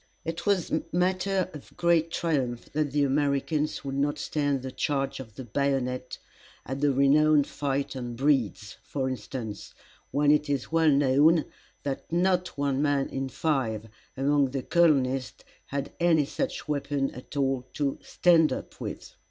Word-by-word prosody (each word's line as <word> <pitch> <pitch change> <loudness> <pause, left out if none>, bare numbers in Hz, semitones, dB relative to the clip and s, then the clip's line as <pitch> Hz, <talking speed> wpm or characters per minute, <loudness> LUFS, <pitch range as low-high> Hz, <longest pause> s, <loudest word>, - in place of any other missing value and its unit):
It 165 +4 -4
was 195 -4 +1 0.2
matter 185 +2 +1
of 150 - -12
great 170 -1 +3
triumph 135 -8 -2
that 150 -1 0
the 145 +1 +2
Americans 145 +2 0
would 135 - -3
not 145 +1 +1
stand 145 -3 -1
the 130 - -5
charge 135 0 -1
of 110 -5 -10
the 130 - -7
bayonet 125 0 -1 0.5
at 135 +2 -4
the 145 -1 +4
renowned 145 +2 +4
fight 140 -1 -2
on 120 -2 -5
Breed's, 125 -6 0
for 135 -2 -3
instance, 115 -3 -6 0.3
when 145 +1 +3
it 150 0 +2
is 140 -1 -2
well 165 -1 +4
known 145 +3 +4 0.4
that 140 +2 -4
not 180 0 +1
one 140 -1 0
man 145 -2 +1
in 135 0 -3
five 115 -9 -1 0.3
among 140 0 +2
the 135 0 -3
colonists 135 -7 +2 0.2
had 140 0 -3
any 165 -4 +4
such - - -3
weapon 140 -2 -1
at 125 +3 -9
all 135 -2 0
to 140 -2 -1
"stand 165 -3 +4
up" - - -6
with. - - -6
140 Hz, 150 wpm, -27 LUFS, 135-155 Hz, 0.5 s, the